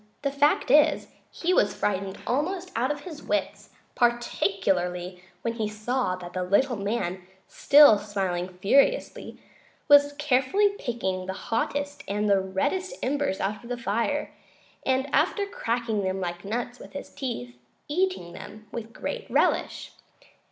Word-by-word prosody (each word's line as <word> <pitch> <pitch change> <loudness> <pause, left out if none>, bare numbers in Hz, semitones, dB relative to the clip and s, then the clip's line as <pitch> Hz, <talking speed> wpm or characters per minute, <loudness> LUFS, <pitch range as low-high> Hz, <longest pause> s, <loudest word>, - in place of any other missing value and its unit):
The 280 - 0
fact 280 -1 +2
is, 300 +2 +4 0.2
he 355 +2 -1
was - - +3
frightened 195 -1 -2
almost 355 +8 -1
out 245 +3 +1
of 290 0 -3
his 310 -2 -9
wits, 310 - -2 0.2
particularly 190 -6 0 0.2
when 230 - -1
he 220 -2 -2
saw 215 -1 -1
that 180 -1 -9
the 185 - -2
little 205 +8 +2
man, 200 -3 -2 0.3
still 285 -7 +7
smiling 190 -4 -2
furiously, 240 - +1 0.5
was 285 0 +6
carefully 295 +8 +2
picking 190 -7 -3
the 190 - -2
hottest 285 +7 -3
and 200 -2 0
reddest 370 - -1
embers 280 -7 0
out 200 +1 -2
of 235 - -11
the 245 - -2
fire, 235 +7 -1 0.5
and, 265 +1 +1
after 405 - +2
cracking 230 - -2
them 190 0 -2
like 175 -1 -4
nuts 240 +4 -4
with - - -12
his 280 - -7
teeth, 125 - -5 0.3
eating 355 - -1
them 215 +1 -10
with 230 -1 -7
great 485 -2 -5
relish. - - +1
235 Hz, 140 wpm, -26 LUFS, 195-285 Hz, 0.5 s, still